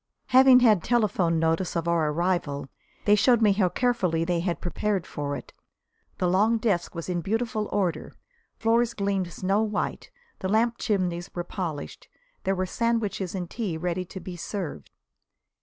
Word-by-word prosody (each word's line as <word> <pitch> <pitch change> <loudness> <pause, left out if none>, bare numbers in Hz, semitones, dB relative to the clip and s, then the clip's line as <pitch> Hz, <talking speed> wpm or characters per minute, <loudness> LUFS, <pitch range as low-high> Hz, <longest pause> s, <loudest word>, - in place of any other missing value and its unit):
Having 260 0 +7
had 215 -8 +5
telephone 195 -8 +2
notice 165 +3 0
of 170 0 -1
our 165 -3 +2
arrival, 150 -4 -1 0.4
they 205 - +5
showed 235 +3 +5
me 215 -3 +5
how 195 -2 +2
carefully 180 -6 +1
they 175 0 0
had 175 0 -2
prepared 195 +1 -1
for 145 -1 -4
it. - - -9 0.6
The 180 - +1
long 210 +6 +3
desk 200 -6 -1
was 170 - -5
in 175 -2 -1
beautiful 220 +2 -1
order; 180 -6 -1 0.5
floors 230 +1 +2
gleamed 195 -3 -1
snow 195 +5 0
white; 215 -1 -2 0.3
the 190 - -3
lamp 230 +3 +2
chimneys 180 -5 -1
were 175 - -2
polished. 170 -5 -5 0.4
There 195 - +1
were 185 0 -1
sandwiches 210 -3 -1
and 180 -2 -3
tea 195 -5 -3
ready 180 +2 -2
to 190 - -8
be 185 -1 -7
served. 170 - -5
185 Hz, 160 wpm, -26 LUFS, 170-215 Hz, 0.6 s, Having